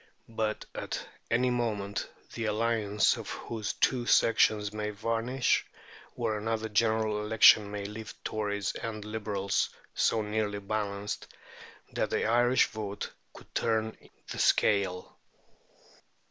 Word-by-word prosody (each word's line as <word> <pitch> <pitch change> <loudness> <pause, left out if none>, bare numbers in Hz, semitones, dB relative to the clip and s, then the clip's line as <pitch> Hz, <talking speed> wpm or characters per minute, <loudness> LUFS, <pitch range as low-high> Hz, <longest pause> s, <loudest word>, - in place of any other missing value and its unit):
But 110 -1 -1
at - - -4 0.2
any 125 +2 +2
moment 105 -5 -2 0.2
the 115 - -3
alliance 105 -1 +2
of - - -6
those 110 -3 -3
two 125 -2 +1
sections 105 -2 +4
may 105 0 -2
vanish, 115 +4 0 0.5
or 110 -3 -1
another 110 +1 -2
General 110 0 +1
Election 105 -1 +6
may 105 -1 -4
leave 105 0 -7
Tories 105 -2 -2
and 110 -2 -5
Liberals 105 -3 -1 0.2
so 110 - +2
nearly 105 -1 -1
balanced 100 0 -3 0.7
that - - 0
the - - 0
Irish 120 +3 +4
vote 105 -2 -5 0.2
could - - -16
turn 110 -1 0 0.4
the - - -4
scale. 100 -3 +2
110 Hz, 120 wpm, -30 LUFS, 105-115 Hz, 0.7 s, Election